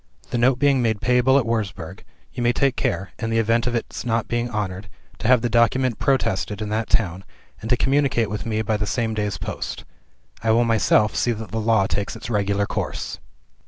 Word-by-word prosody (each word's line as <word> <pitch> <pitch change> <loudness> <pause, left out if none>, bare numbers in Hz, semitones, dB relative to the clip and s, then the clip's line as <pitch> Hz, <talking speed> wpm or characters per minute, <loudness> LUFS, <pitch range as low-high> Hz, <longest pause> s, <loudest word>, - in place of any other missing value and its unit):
The 120 - 0
note 125 +1 +4
being 140 -1 +3
made 110 -3 0
payable 125 +3 +3
at 135 - +2
Wurzburg, 105 -7 -3 0.3
you - - -4
must 120 0 +2
take 135 -2 +2
care 95 +3 -2
(in 115 - -2
the 115 - 0
event 115 +2 +2
of 125 - -1
its 115 - -4
not 115 -2 0
being 120 +1 -1
honored) 100 -3 -4 0.3
to 110 - -2
have 125 -2 +5
the - - +2
document 120 +1 +2
protested 110 -6 0
in 105 -1 -4
that 110 +1 -2
town, 95 -3 +1 0.4
and 110 - -6
to 125 - +3
communicate 135 -4 +2
with 105 - -3
me 110 -1 -1
by 110 0 0
the 105 0 -2
same 115 -2 -1
day's 105 -2 -2
post. - - -5 0.6
I 115 - -1
will 115 +2 +4
myself 110 -1 +3
see 120 - +1
that 110 -3 -8
the 110 +1 -2
law 110 -3 +3
takes 100 +1 -2
its - - -7
regular 100 -1 +1
course. - - -4
115 Hz, 210 wpm, -22 LUFS, 105-120 Hz, 0.6 s, have